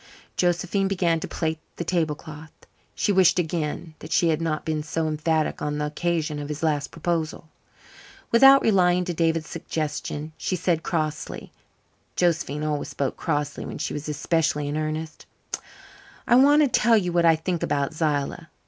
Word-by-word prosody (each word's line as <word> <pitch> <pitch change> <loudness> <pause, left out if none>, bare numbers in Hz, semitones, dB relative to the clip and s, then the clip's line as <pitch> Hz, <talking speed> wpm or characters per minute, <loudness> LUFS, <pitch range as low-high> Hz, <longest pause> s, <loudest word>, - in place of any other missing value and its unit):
Josephine 185 +2 +1
began 175 -4 +1
to - - -5
plait 160 -1 -2 0.2
the - - -3
tablecloth. 160 -2 -3 0.4
She 205 - +1
wished 185 -2 +5
again 160 -1 -2
that 155 - -10
she 170 - +3
had 160 0 +1
not 155 -2 -2
been 155 -1 -1
so 160 +1 -2
emphatic 155 0 0
on 150 0 -2
the 150 - -1
occasion 155 0 -1
of 145 0 -6
his 150 +1 -5
last 150 -3 0
proposal. 165 -1 -3 0.8
Without 270 +3 +7
replying 180 -4 +3
to 175 - -2
David's 165 -1 0
suggestion 155 -1 -4
she 185 - -1
said 175 -2 0
crossly 155 -2 -3 0.6
(Josephine 165 -4 0
always 150 -2 -1
spoke 140 -2 -2
crossly 145 -2 -2
when - - -6
she - - -3
was 150 +1 -5
especially 150 0 0
in 145 - -3
earnest): 155 0 -4 1.0
"I - - +4
want 285 +4 +6
to - - +4
tell 230 -2 +4
you 180 -4 -1
what 170 -1 +3
I 165 -1 +6
think 170 +2 -3
about 140 0 0
Zillah. 150 -3 -1
160 Hz, 165 wpm, -24 LUFS, 150-175 Hz, 1.0 s, Without